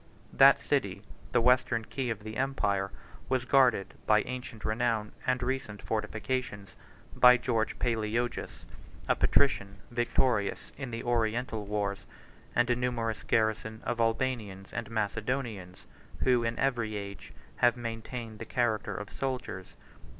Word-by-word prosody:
That - - +7
city, - - -1 0.3
the - - +3
western 125 -2 +3
key 130 +1 -3
of 110 -2 -4
the 110 0 -6
empire, 105 -8 0 0.4
was 130 -1 +1
guarded 125 -8 +4
by 105 -1 +5
ancient 125 -3 -7
renown, 110 -1 0 0.2
and 125 -1 +1
recent 125 -5 -2
fortifications, 110 0 -3 0.4
by 125 0 +8
George 115 -3 -1
Palaeologus, 115 0 -2 0.4
a - - +3
patrician, 100 -8 +2
victorious 120 -2 +1
in 135 -2 -5
the 115 0 -5
Oriental 115 -2 0
wars, 100 -1 -2 0.5
and 120 - +4
a - - +4
numerous 120 -3 -1
garrison 110 0 0
of 120 -1 -1
Albanians 115 -4 -1
and 115 -3 -4
Macedonians, 110 -3 -3 0.4
who, 125 -2 +4
in 115 0 -1
every 120 -5 0
age, 100 -1 -7 0.3
have 120 0 +4
maintained 115 -1 -6
the 115 - -5
character 110 -2 0
of 105 -1 -6
soldiers. 125 -8 -4
115 Hz, 130 wpm, -30 LUFS, 105-125 Hz, 0.5 s, by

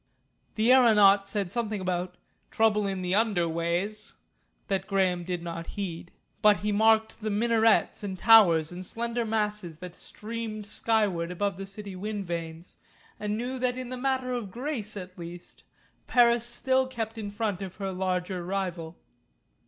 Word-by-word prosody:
The 225 +3 +3
aeronaut 205 -6 +6
said 195 -3 -2
something 220 -2 -2
about 180 -1 -3 0.3
"trouble 210 -2 +2
in 190 -1 -3
the 180 0 -1
under 205 -5 +2
ways," 175 +6 -2 0.5
that 195 -1 -1
Graham 185 -3 +1
did 175 -1 -4
not 165 -1 -6
heed. 175 -3 -4 0.3
But 210 -1 +6
he 210 0 -2
marked 220 +2 +3
the 215 - -2
minarets 225 +1 +2
and 190 -2 -4
towers 180 -8 +6
and 180 +1 -7
slender 235 +4 -2
masses 210 -6 -2
that 180 +1 -9
streamed 215 +1 -6
skyward 205 -6 0
above 200 +2 -1
the 195 +1 -7
city 200 -1 -8
wind 205 +1 -4
vanes, 165 0 -6 0.4
and 210 0 -2
knew 250 +3 -3
that 250 0 0
in 255 -1 -5
the 255 - -4
matter 260 0 -1
of 235 -5 -3
grace 235 -3 -3
at 185 -1 -9
least 170 +1 -10 0.4
Paris 235 -1 +4
still 260 +2 +1
kept 225 -3 -5
in 205 -2 -4
front 205 -2 -2
of 190 -2 -6
her 195 -1 -4
larger 185 -1 -2
rival. 175 -3 -4
205 Hz, 160 wpm, -28 LUFS, 180-225 Hz, 0.5 s, aeronaut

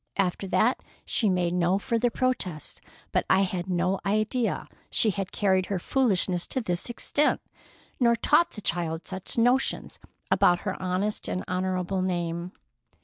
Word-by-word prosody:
After 195 0 0
that 230 +6 +2 0.3
she 215 - +1
made 180 -2 +1
no 180 +1 +2
further 235 +2 0
protest. 225 - -2 0.3
But - - +2
I 190 - +5
had 185 -1 -2
no 180 +2 +1
idea 215 +4 0 0.2
she 220 - +3
had 195 -1 -4
carried 190 -2 +2
her 200 - -1
foolishness 185 -5 +1
to 260 - -1
this 180 -3 -2
extent, 290 +5 +1 0.6
nor 235 -2 +4
taught 305 +8 +3
the 210 - -8
child 165 -3 -2
such 190 +3 -3
notions 245 +3 +1 0.3
about 175 0 +4
her 190 -2 -2
honest 185 +3 -1
and 185 - -2
honorable 185 0 -1
name." 175 -1 -2
190 Hz, 145 wpm, -27 LUFS, 180-220 Hz, 0.6 s, I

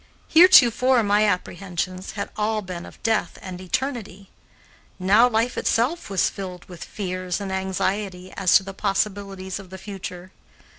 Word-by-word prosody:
Heretofore 260 -8 +6
my 205 +1 +3
apprehensions 185 -1 -3
had 200 -1 -5
all 215 0 -1
been 175 -2 -7
of - - -16
death 225 -1 0
and 185 -1 -8
eternity; 200 -2 -4 0.7
now 205 +6 +5
life 230 +2 0
itself 255 +8 0
was 195 -3 +2
filled 185 -2 -7
with 175 -3 -10
fears 185 -2 -4
and 200 -1 -5
anxiety 190 0 -2
as 190 -3 +3
to - - -4
the 195 +1 -8
possibilities 195 -1 -2
of 195 -2 -12
the 190 - -9
future. 185 -2 -8
195 Hz, 145 wpm, -23 LUFS, 185-215 Hz, 0.7 s, Heretofore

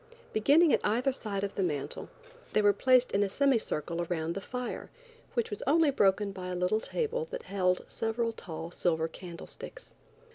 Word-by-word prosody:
Beginning 290 +9 +5
at - - +2
either 245 +6 +2
side 205 -6 -3
of 200 - -2
the - - -2
mantel 150 -7 -1 0.4
they 215 - +4
were 205 0 +6
placed 255 +4 +4
in 200 - +2
a 200 - +2
semi 275 +2 +3
circle 170 -3 -2
around 165 -1 -2
the 195 - -4
fire, 250 +3 -5 0.5
which 235 -3 0
was 205 - -4
only 310 +1 +5
broken 200 -4 +3
by 185 -1 -6
a 180 - -3
little 180 +4 +1
table 475 - -2
that - - -5
held 185 -2 0
several 230 +1 -1
tall 170 -6 -7
silver 160 -2 +1
candlesticks. 175 - -10
205 Hz, 180 wpm, -30 LUFS, 180-255 Hz, 0.5 s, were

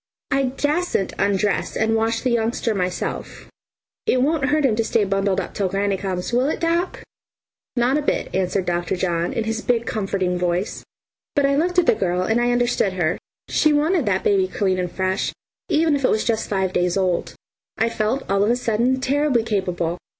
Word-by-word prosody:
I 275 -1 +2
dasn't 290 - -1
undress 200 0 0
and 220 0 +2
wash 225 +1 0
the 255 - 0
youngster 230 0 0
myself. 180 -2 -3 0.6
It 255 0 +3
won't 300 0 +1
hurt 295 +1 +2
him 235 -5 +3
to 225 - +2
stay 220 -1 +1
bundled 195 -1 0
up - - -4
until 195 -2 -2
granny 195 +1 0
comes, 190 +2 -3
will 255 +4 +2
it, - - -2
doc?" 340 +2 -1 0.7
"Not 250 +4 +2
a - - -2
bit," 290 - -1
answered 185 0 0
Dr. 175 +1 -1
John 175 -2 -1
in 225 - -1
his 225 +1 -2
big 235 -1 0
comforting 195 -5 -1
voice. 180 +2 -1 0.5
But 285 -2 +3
I 275 0 +2
looked 350 +4 0
at 360 - +5
the - - +5
girl, 180 -4 0
and 225 +5 +1
I 240 - +2
understood 240 -5 +1
her. 175 -2 0 0.3
She 305 - +3
wanted 305 - +2
that 190 -2 +1
baby 195 -2 +3
clean 190 -1 0
and 180 -1 -2
fresh, 185 0 -1 0.4
even 315 -1 +3
if 280 - -3
it - - +4
was 215 - +1
just 225 -1 -1
five 190 -2 0
days 180 +1 +1
old, 185 -3 0 0.4
and 225 - +2
I 230 - -2
felt 220 +6 -1
all 195 +1 +2
of 210 - +2
a 240 - +3
sudden 245 +2 +1
terribly 275 -3 +2
capable. 180 -5 -1
220 Hz, 200 wpm, -22 LUFS, 190-260 Hz, 0.7 s, at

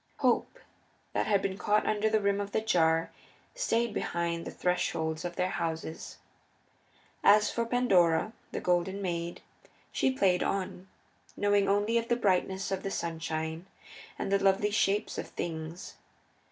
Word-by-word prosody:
Hope, - - +1 0.6
that - - 0
had 200 -2 +2
been 195 0 -2
caught 210 +1 +2
under 215 0 +1
the 220 0 +3
rim 200 0 +1
of 200 0 -6
the 220 - +1
jar, 165 -6 +2 0.4
stayed 235 - 0
behind 170 -3 -2
the - - -4
thresholds 160 -3 -1
of 175 -1 -4
their 185 0 0
houses. 165 -2 -4 1.1
As 210 +1 +6
for 235 -1 -1
Pandora, 200 -6 +3 0.2
the - - -4
Golden 180 +2 +1
Maid, 170 -3 -3 0.5
she - - +2
played 190 -8 +2
on, 190 -1 -2 0.5
knowing 205 -1 +3
only 205 +4 +2
the 235 +1 0
brightness 190 -3 0
of 195 - -1
the 195 - -3
sunshine 160 -1 -3 0.5
and - - -3
the 200 0 +2
lovely 195 +2 +3
shapes 205 0 +1
of - - -5
things. 165 +1 -6
195 Hz, 145 wpm, -30 LUFS, 170-210 Hz, 1.1 s, As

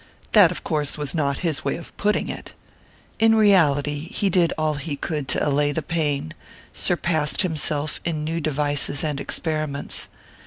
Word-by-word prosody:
That, 205 -6 +7
of 180 - -5
course, 150 -2 -1
was 145 -2 -2
not 140 -4 0
his 155 -2 0
way - - 0
of 170 - -10
putting 210 +1 0
it. - - -7 0.6
In 225 0 +5
reality, 150 -9 +4
he 195 +3 -1
did 170 -2 +3
all 155 -1 +1
he 145 +1 -4
could 150 -1 -3
to - - 0
allay 145 0 +2
the 155 +2 -2
pain, 145 - -1 0.4
surpassed 170 -2 +2
himself 155 -3 -2
in 160 -3 -2
new 165 +2 -2
devices 145 -1 0
and 150 -3 -2
experiments. 155 -3 -2
155 Hz, 160 wpm, -23 LUFS, 145-170 Hz, 0.6 s, That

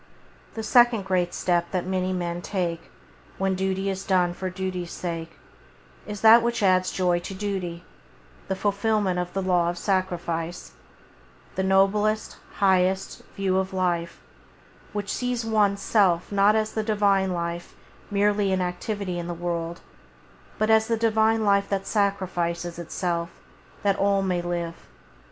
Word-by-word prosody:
The 220 - -4
second 240 -2 +4
great 180 -2 +1
step 175 -1 0
that 180 -2 -2
men 185 0 -1
may 175 0 -3
take, 175 -4 -3 0.5
when 195 0 +1
duty 190 +1 -1
is 195 0 -2
done 180 -2 +2
for 185 +1 -4
duty's 185 -1 -4
sake, 165 -2 -5 0.7
is 210 -1 -6
that 225 +1 +8
which 235 -2 -1
adds 185 -1 +3
joy 180 -2 +1
to 190 +2 -7
duty 190 -4 -4 0.3
— - - -27
the 190 - -1
fulfilment 200 -1 0
of 180 0 -3
the 195 - -1
Law 175 -2 +2
of 175 - -4
Sacrifice; 175 -3 -2 0.8
that 190 - -1
noblest, 205 +3 +2 0.2
highest, 190 -1 +1
view 190 -1 +1
of 190 0 -3
life, 175 -2 -1 0.7
which 205 -1 -3
sees 245 -2 -2
one's 205 -3 +2
self 185 -5 +2
not 200 +1 +4
as 220 0 0
the 220 - 0
Divine 200 -3 +2
Life 170 0 -4 0.3
merely 205 0 +2
in 190 - +1
activity 180 +1 -3
in 170 - -5
the 175 - -4
world, 170 0 -3 0.8
but 215 +1 +2
as 220 0 +4
the 230 -1 +1
Divine 220 0 +2
Life 200 -1 +3
that 195 -1 -1
sacrifices 175 -4 -1
Itself 170 0 -2 0.5
that 200 -1 +2
all 200 0 +2
may 180 -2 0
live. 175 -1 -4
190 Hz, 150 wpm, -25 LUFS, 175-205 Hz, 0.8 s, that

